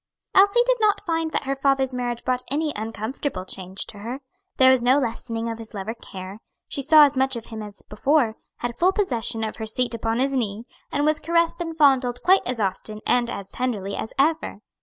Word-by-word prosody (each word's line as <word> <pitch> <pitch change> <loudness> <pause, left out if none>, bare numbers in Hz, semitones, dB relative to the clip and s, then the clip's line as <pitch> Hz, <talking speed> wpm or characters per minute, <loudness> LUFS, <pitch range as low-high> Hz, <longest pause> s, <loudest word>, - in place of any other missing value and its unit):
Elsie 400 +5 +6
did - - +2
not 420 -1 +2
find 325 -2 -1
that - - -1
her 275 0 -2
father's 270 -1 +1
marriage 245 -1 -3
brought 255 -1 +1
any 300 +2 -1
uncomfortable 220 +1 -4
change 190 0 -3
to 205 - -10
her. 235 +6 -5 0.4
There 260 0 +7
was 260 -2 +3
no 250 +3 +4
lessening 230 -3 -2
of 230 0 -4
his 225 0 -7
love 195 0 -5
or 225 - -2
care; 190 -3 -9 0.3
she 280 - -2
saw 305 +2 +7
as 285 -1 -1
much 265 0 +1
of 230 -1 -6
him 220 -1 -7
as 210 -1 -9
before, 240 +1 +1 0.2
had 240 -1 -5
full 370 +2 +4
possession 235 - -1
of 220 - -4
her 220 -1 -5
seat 240 +2 0
upon 225 0 -1
his 270 +2 +1
knee, 225 -3 -2 0.3
and 290 - 0
was 310 0 +2
caressed 335 +2 +1
and 330 -1 -4
fondled 260 -5 +3
quite 380 +2 +5
as 250 -2 -2
often 210 +2 -3
and 245 -1 +2
as 200 -5 -6
tenderly 210 -6 -2
as 220 - -5
ever. 305 -6 +1
250 Hz, 215 wpm, -23 LUFS, 220-290 Hz, 0.4 s, There